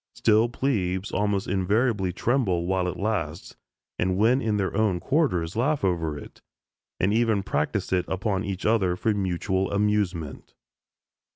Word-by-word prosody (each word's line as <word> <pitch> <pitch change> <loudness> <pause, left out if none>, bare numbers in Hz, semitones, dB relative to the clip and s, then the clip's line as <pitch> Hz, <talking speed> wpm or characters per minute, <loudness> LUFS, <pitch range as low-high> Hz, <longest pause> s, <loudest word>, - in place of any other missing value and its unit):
Still 110 +1 +3
"plebes" 100 -8 -1
almost 100 -1 0
invariably 100 +1 +1
tremble 95 -4 0
while 95 0 0
it 90 - -4
lasts, 95 -6 -3 0.4
and 90 0 +1
when 120 +6 +3
in 110 -4 0
their 95 -1 -1
own 100 -4 +1
quarters 90 - 0
laugh 140 +4 0
over 80 -5 0
it, - - -12 0.6
and 95 +3 +2
even 110 -3 +2
practise 95 +3 -1
it 90 -1 +1
upon 95 0 -1
each 100 -1 -4
other 100 -5 +2
for 110 +4 0
mutual 95 -1 -1
amusement. 100 -7 -1
100 Hz, 145 wpm, -25 LUFS, 90-110 Hz, 0.6 s, Still